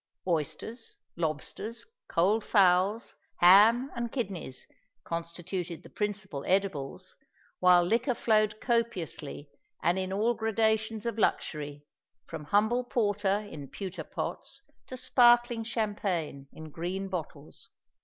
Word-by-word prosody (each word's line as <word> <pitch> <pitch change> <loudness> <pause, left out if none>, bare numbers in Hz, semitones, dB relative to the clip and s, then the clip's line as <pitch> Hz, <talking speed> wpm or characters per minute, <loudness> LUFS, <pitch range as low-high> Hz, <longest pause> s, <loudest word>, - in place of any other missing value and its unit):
Oysters, 170 - -3 0.2
lobsters, 170 +8 -4 0.2
cold 205 +6 +2
fowls, 195 +3 +3 0.2
ham, 220 +9 +6
and 235 -1 -3
kidneys, 190 - -4 0.4
constituted 170 +1 -5
the - - -14
principal 200 -8 -3
edibles; 185 -8 -1 0.4
while 180 -1 +6
liquor 235 +7 +1
flowed 215 -2 +2
copiously 190 - -2 0.3
and 175 +2 +2
in 185 0 -3
all 215 +5 +2
gradations 220 0 0
of 230 -1 -2
luxury, 145 -7 -1 0.4
from 160 -2 -7
humble 220 +9 +2
porter 205 -3 0
in 145 -3 -8
pewter 190 +4 -6
pots - - -5 0.2
to 255 - -7
sparkling 240 -2 +4
champagne 200 - -2
in 160 -1 -10
green 180 +5 -3
bottles. 160 -5 -7
195 Hz, 110 wpm, -29 LUFS, 170-225 Hz, 0.4 s, ham